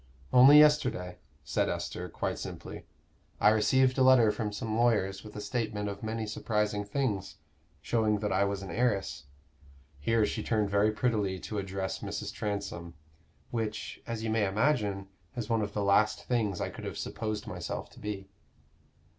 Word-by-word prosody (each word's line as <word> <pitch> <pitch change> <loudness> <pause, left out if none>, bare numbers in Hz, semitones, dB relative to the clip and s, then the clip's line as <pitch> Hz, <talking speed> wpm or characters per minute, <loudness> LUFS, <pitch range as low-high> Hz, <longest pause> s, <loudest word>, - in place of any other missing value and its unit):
"Only 130 +4 +9
yesterday," 125 -12 +4 0.2
said - - 0
Esther, - - -4
quite - - -3
simply, - - -8 0.5
"I - - +6
received 130 +5 +3
a - - +4
letter 130 -4 +6
from 105 -1 -3
some 110 +1 -3
lawyers 105 -5 +1
with 105 - -11
a 105 - -5
statement 105 -1 -2
of 100 0 -7
many 110 0 -3
surprising 105 -1 -1
things, 105 -2 -2 0.5
showing 110 -2 +1
that 105 - -1
I 95 +2 +3
was 100 -1 -2
an 95 - -7
heiress" 100 -8 0 0.7
here 115 +8 +2
she - - -3
turned 105 -3 0
very 100 +2 +3
prettily 105 -5 0
to 105 - -4
address 95 -1 -3
Mrs. - - -5
Transome 100 -5 -4 0.6
"which, 110 -2 -4
as 115 -2 -4
you 110 - -1
may 110 -2 +2
imagine, 105 -3 0 0.3
is 120 -3 -4
one 115 -1 +2
of 100 -1 -3
the 105 - -1
last 105 +2 +3
things 110 -7 0
I - - -2
could - - -10
have - - -5
supposed 110 -1 -4
myself - - -5
to - - -15
be." 100 -2 -5
105 Hz, 165 wpm, -30 LUFS, 100-115 Hz, 0.7 s, Only